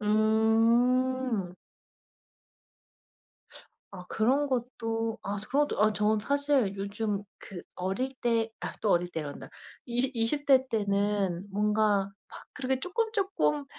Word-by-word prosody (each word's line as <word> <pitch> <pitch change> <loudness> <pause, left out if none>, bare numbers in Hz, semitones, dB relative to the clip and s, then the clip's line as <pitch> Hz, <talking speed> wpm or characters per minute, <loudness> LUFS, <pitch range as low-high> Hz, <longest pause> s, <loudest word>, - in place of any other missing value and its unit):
음. 225 +1 +2 2.4
아 180 -2 -9
그런 270 +6 +1
것도 230 -3 -2
아 200 +1 -3
그런 290 +2 +2
것도 - - -4
아 215 0 +4
저는 215 +1 +2
사실 280 -4 +1
요즘 200 +1 -2 0.2
그 185 -4 -9
어릴 195 +9 -2
때 230 -2 +1
아 - - -4
또 215 - +2
어릴 175 0 +2
때란다. 155 -4 -6 0.4
이시 245 +2 0
이십 235 +6 0
대 265 -2 +5
때는 200 -4 0
뭔가 210 -1 +1 0.2
막 - - -12
그렇게 265 0 -2
쪼끔, 445 - -1
쪼끔 150 - 0
225 Hz, 200 characters per minute, -29 LUFS, 200-255 Hz, 2.4 s, 대